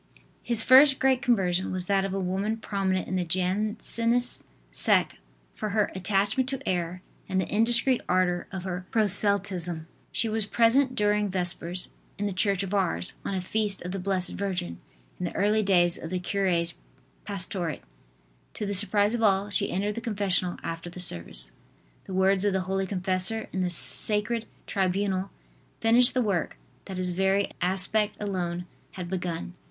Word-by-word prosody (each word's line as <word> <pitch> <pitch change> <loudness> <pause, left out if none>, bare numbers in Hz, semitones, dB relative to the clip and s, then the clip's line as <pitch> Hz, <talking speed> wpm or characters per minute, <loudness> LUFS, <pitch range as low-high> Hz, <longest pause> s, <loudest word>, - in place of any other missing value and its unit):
His 235 -2 +1
first 270 +1 +7
great 260 -1 +2
conversion 190 -8 +1
was 185 -1 -3
that 195 0 +1
of 195 - -3
a 195 - -2
woman 195 +4 -2
prominent 195 -4 -2
in 185 - -2
the 180 - 0
Jansenist 215 +7 0 0.3
sect - - +2 0.4
for 215 - -4
her 210 0 0
attachment 200 +7 0
to 275 +1 -5
error 180 0 -2 0.3
and 190 0 0
the 185 - -1
indiscreet 240 +3 +3
ardor 180 -1 +1
of 190 -2 -6
her 185 -1 -5
proselytism. 195 -5 +1 0.3
She 230 - 0
was 220 -1 0
present 255 +4 +3
during 210 0 +1
Vespers, 180 -1 0 0.3
in 205 - -2
the 200 - -2
church 195 +1 +1
of 195 0 -5
Ars, 190 -2 0
on 200 - -3
a 185 - -2
feast 205 +1 +1
of 180 - -5
the 195 - -4
Blessed 185 -1 -1
Virgin, 180 - -4 0.4
in 180 - -2
the - - -5
early 210 +2 +2
days 175 -4 +4
of 165 - -7
the 185 - -2
cure's 180 -2 0 0.5
pastorate. 185 -4 -3 0.7
To 210 - -4
the 200 - -2
surprise 205 +2 +5
of 240 - -2
all, 200 -1 +2
she 185 - +2
entered 205 +3 -1
the 230 - -6
confessional 195 -5 -1
after 165 +1 -5
the 175 - -10
service. 85 - -1 0.5
The 190 - -8
words 190 +1 +2
of 205 -1 +1
the 190 - 0
holy 190 +1 -2
confessor 185 +3 +2
in 190 - -1
the 180 - 0
sacred 215 +6 +1 0.2
tribunal 195 0 -1 0.5
finished 235 +3 +5
the 255 - +2
work 195 -6 -1 0.3
that 190 -2 -7
his 180 -1 -2
very 190 +2 +1
aspect 195 +3 +1
alone 180 -4 -3 0.3
had 180 -2 -6
begun. 175 -1 -4
195 Hz, 170 wpm, -27 LUFS, 180-210 Hz, 0.7 s, first